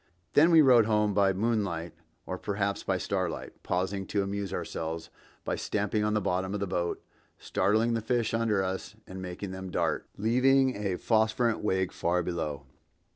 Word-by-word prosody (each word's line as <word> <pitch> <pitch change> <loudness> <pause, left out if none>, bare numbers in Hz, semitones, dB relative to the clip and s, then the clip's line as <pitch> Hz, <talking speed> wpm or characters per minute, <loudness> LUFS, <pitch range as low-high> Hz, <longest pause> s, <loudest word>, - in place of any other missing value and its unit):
Then 160 +4 +6
we 165 -2 +7
rowed 120 -5 +6
home 105 -1 +2
by 100 -1 +4
moonlight 95 -5 -1 0.3
or 95 0 -5
perhaps 100 0 -1
by 95 - 0
starlight, 95 -2 -3
pausing 95 +2 -2
to 100 - 0
amuse 100 0 -3
ourselves 80 +1 -4 0.3
by - - -1
stamping 105 +1 -1
on 105 0 +1
the - - +3
bottom 95 +1 -1
of - - -2
the 100 - -1
boat, 90 -2 -2 0.3
startling 110 +3 +1
the 115 - 0
fish 115 0 0
under 110 -4 +1
us 95 +2 -4
and 95 0 -8
making 95 +2 -6
them 95 0 -6
dart, - - -1
leaving 130 +4 +3
a 100 -3 -2
phosphorescent 110 +1 +1
wake 95 -3 +1
far 90 +1 0
below. 80 -5 -3
100 Hz, 170 wpm, -29 LUFS, 95-110 Hz, 0.3 s, we